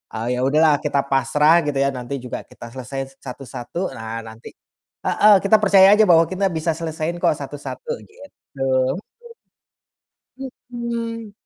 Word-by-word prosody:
eee, 120 +3 -2
ya - - -3
udahlah 150 +1 +4
kita 140 -1 0
pasrah 150 +5 +4
gitu 145 - -2
ya, 140 0 +2
nanti 125 +1 -5
juga 125 - -5
kita 120 0 -12
selesai 135 +1 -7
satu-satu, 130 +6 -6
nah 110 0 -6
nanti 110 +1 -11 0.5
heeh, 210 0 +5
kita 200 +2 +5
percaya 195 0 +7
aja 215 - +5
bahwa 165 -1 +6
kita 195 +1 -2
bisa 160 +1 -1
selesaiin 165 +1 -4
kok - - +4
satu-satu, 145 - -7
gitu. 285 -10 -15 0.3
Mhm. 130 0 +1 1.8
Mhm. 230 -2 -5
150 Hz, 140 wpm, -21 LUFS, 130-190 Hz, 1.8 s, percaya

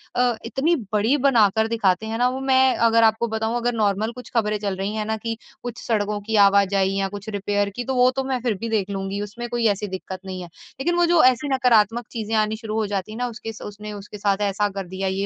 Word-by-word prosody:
अ, 245 -1 +2
इतनी 285 +8 +1 0.2
बड़ी 220 +7 +3
बनाकर 220 -3 +3
दिखाते 215 -3 +1
हैं 225 +1 -3
ना 245 +1 +3
वो 260 +1 -4
मैं 265 -1 +4
अगर 230 0 +4
आपको 220 +1 +3
बताऊँ 220 +1 -2
अगर 240 0 0
नॉर्मल 215 0 0
कुछ 250 +1 -11
ख़बरें 210 -2 +1
चल 200 -2 -2
रही 195 +2 -2
हैं 215 -1 -2
ना 220 0 -1
कि 225 0 -4 0.3
कुछ 240 -1 -5
सड़कों 210 -2 0
की 220 +2 -3
आवाजाही 195 -1 +3
या 195 - 0
कुछ 205 +1 -9
रिपेयर 205 0 -1
की 245 - -3
तो 265 +1 -2
वो 250 0 +5
तो 265 +1 -2
मैं 260 -1 -1
फ़िर 240 -3 0
भी 230 +4 -4
देख 205 -3 0
लूँगी 195 +1 -3
उसमें 225 +4 -6
कोई 240 -1 -1
ऐसी 205 0 0
दिक़्क़त 190 0 -6
नहीं 185 -1 -5
है। 175 - -7
लेकिन 270 - -4
वो 350 0 +4
जो 340 -1 +4
ऐसी 255 +3 +4
नकारात्मक 235 -2 +3
चीज़ें 225 -1 -3
आनी 215 0 +1
शुरू 220 -1 -6
हो 220 -1 +1
जाती 200 +1 -3
है 220 - -7
ना 245 - -1
उसके 225 -1 -7
उसने 210 +1 -8
उसके 205 +1 -9
साथ 200 0 0
ऐसा 205 +1 0
कर 195 -2 -6
दिया, 190 +1 -3
ये 190 +1 -1
220 Hz, 250 wpm, -23 LUFS, 200-240 Hz, 0.3 s, वो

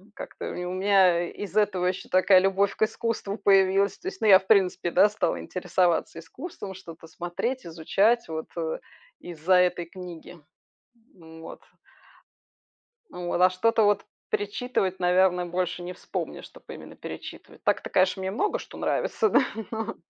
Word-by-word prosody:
Как-то - - -7
у 180 0 -5
мя 185 -3 +3
из-за 205 +1 0
этого 190 -3 -1
ещё 185 0 -2
такая 185 +1 +5
любовь 195 +1 +1
к - - -22
искусству 220 -2 -2
появилась. 195 0 +3
То 360 - -8
есть, 380 0 -6
ну, - - +2
я, 190 -2 +9
в 190 - -19
принципе, 190 -4 +2
да, 210 - +5
стала 210 - -1
интересоваться 180 -2 -1
искусством, 195 - -8
что-то 165 -3 -12
смотреть, 175 +10 -4
изучать 195 +8 +1
вот 160 0 -5 0.7
из-за 175 +1 0
этой 180 -1 +2
книги. 175 -1 -10 0.8
Вот. 160 -2 -12 1.5
Вот, 175 0 -3
а 185 0 +6
что-то 225 +5 +2
вот 205 -1 +2 0.3
перечитывать, 205 -2 -1
наверное, 180 0 +3
больше 180 0 -3
не 175 +1 -6
вспомнишь, - - -6
чтоб - - -18
именно - - -10
перечитывать. - - -10
Так-то, - - 0
конечно, 185 0 +2
мне 190 0 -2
много 420 - -1
что - - -11
нравится, 440 - 0
да, - - +4 0.3
но 225 0 -4
185 Hz, 145 wpm, -26 LUFS, 175-205 Hz, 1.5 s, я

